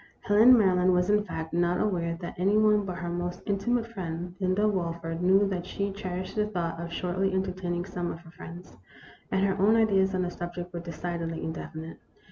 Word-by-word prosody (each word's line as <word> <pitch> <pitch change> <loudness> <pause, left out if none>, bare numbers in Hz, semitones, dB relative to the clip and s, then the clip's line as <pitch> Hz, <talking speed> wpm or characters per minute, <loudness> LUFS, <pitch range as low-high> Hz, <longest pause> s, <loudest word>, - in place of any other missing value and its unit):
Helen 225 +5 +7
Maryland 185 -3 +4
was, 180 +2 +2
in 210 0 +3
fact, 160 -5 -6
not 175 +1 +2
aware 170 -5 0
that 175 - -5
any 200 +3 +3
one 210 -1 +4
but 185 -2 -4
her 180 -2 -4
most 175 +1 -4
intimate 225 +4 0
friend, 175 -5 -5
Linda 190 +2 +2
Walford, 170 -4 -2
knew 190 +3 +4
that 180 -3 -2
she 200 0 -2
cherished 185 -1 -5
the 210 -1 +1
thought 170 -5 -3
of 170 0 -6
shortly 185 +3 -1
entertaining 185 -2 -2
some 180 -2 -3
of 165 - -8
her 165 -1 -15
friends, 175 +1 -11 0.5
and 190 +1 +2
her 195 -1 +1
own 210 +3 +5
ideas 195 -4 +3
on 185 - +1
the 175 - -2
subject 175 0 -6
were 170 - -3
decidedly 170 0 -4
indefinite. 160 0 -6
180 Hz, 195 wpm, -28 LUFS, 175-195 Hz, 0.5 s, Helen